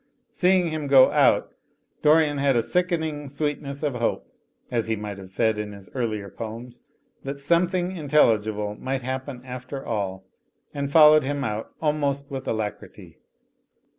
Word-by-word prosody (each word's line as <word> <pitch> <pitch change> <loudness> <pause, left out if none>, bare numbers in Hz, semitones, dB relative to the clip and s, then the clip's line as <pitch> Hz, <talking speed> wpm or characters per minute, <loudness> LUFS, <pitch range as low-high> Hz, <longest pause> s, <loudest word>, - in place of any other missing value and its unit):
Seeing 180 -2 +2
him 155 -2 -3
go 135 -2 +7
out, - - +3 0.5
Dorian 150 -1 +4
had 140 -1 +2
a 115 - +2
sickening 160 -5 -1
sweetness 145 0 -3
of 145 -3 0
hope 120 -1 -2 0.4
(as 115 -3 -1
he 110 - 0
might 105 -2 -6
have 95 -1 -11
said 110 +2 0
in 105 -1 -5
his 100 -1 -12
earlier 110 -6 -2
poems), 115 +4 -8 0.4
that 140 +1 -6
some 170 +5 +3
thing 180 0 -2
intelligible 110 - +2
might 130 +4 -4
happen 130 0 -5
after 125 +2 -7
all, 95 -4 -3 0.5
and 140 -1 -3
followed 155 -1 +7
him 140 +1 -2
out 110 -2 -4
almost 140 -2 0
with 135 -1 -5
alacrity. 110 -2 -5
135 Hz, 150 wpm, -24 LUFS, 110-150 Hz, 0.5 s, go